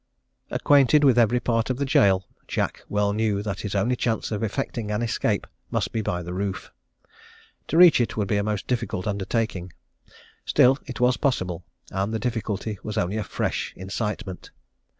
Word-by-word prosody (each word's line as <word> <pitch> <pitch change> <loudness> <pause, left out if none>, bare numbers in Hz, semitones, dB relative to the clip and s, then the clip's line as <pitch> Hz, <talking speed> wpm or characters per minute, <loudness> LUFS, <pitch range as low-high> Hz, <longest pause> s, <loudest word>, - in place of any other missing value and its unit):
"Acquainted 145 +1 +4
with 130 -4 +5
every 120 +1 +4
part 115 0 0
of 130 - -1
the 140 - -1
gaol, 95 -7 +3 0.2
Jack - - -2
well 105 0 +1
knew 105 -2 0
that 100 -3 -3
his 105 -1 -4
only 110 +6 +2
chance 115 -2 -1
of 105 - -2
effecting 115 0 -3
an 105 +2 -1
escape 115 - 0 0.2
must - - -1
be 110 - -1
by 90 -3 -2
the 90 +1 -6
roof. 95 0 -4 1.0
To 160 - 0
reach 175 -7 +8
it 120 - -2
would 105 -2 0
be 105 - +1
a 100 - +1
most 105 -2 -2
difficult 115 -7 -2
undertaking. 100 -2 -2 0.7
Still 130 +2 +4
it 130 - -6
was 125 +1 +3
possible, 90 -10 -1 0.3
and 95 +3 -1
the 110 - 0
difficulty 110 -3 -3
was 105 - -5
only 90 +5 0
a 110 - -1
fresh - - -2
incitement. 95 0 -4
105 Hz, 175 wpm, -25 LUFS, 100-120 Hz, 1.0 s, reach